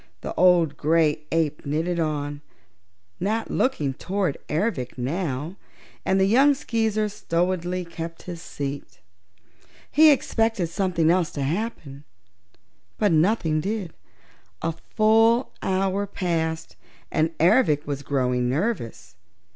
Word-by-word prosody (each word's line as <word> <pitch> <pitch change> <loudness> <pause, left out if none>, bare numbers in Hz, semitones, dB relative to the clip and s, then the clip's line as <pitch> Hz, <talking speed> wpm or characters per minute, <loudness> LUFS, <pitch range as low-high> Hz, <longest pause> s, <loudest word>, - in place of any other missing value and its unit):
The - - -5
old 175 -4 +4
gray 155 -1 +2
ape 160 -3 0
knitted 165 +4 -1
on, 145 -2 -2 0.8
not 215 +5 -1
looking 150 - 0
toward 185 +1 -2
Ervic 150 - -1
now, 150 +4 -3 0.5
and 190 0 +2
the 190 - +4
young 270 +8 +5
Skeezer 220 -5 0
stolidly 180 -1 -1
kept 165 0 -7
his 175 -2 -7
seat. 140 -2 -6 0.9
He 310 +2 +7
expected 225 - +1
something 170 -2 +1
else 175 -3 +2
to 140 - -3
happen, 150 -4 -4 0.9
but 210 -3 +2
nothing 160 -2 +2
did. 195 -2 -3 0.7
A 165 - +1 0.2
full 225 +3 +4
hour 195 +1 0
passed 165 -4 -2 0.3
and 160 +1 0
Ervic 160 - +3
was 140 -1 -3
growing 125 -3 0
nervous. 130 - -3
170 Hz, 115 wpm, -24 LUFS, 150-205 Hz, 0.9 s, He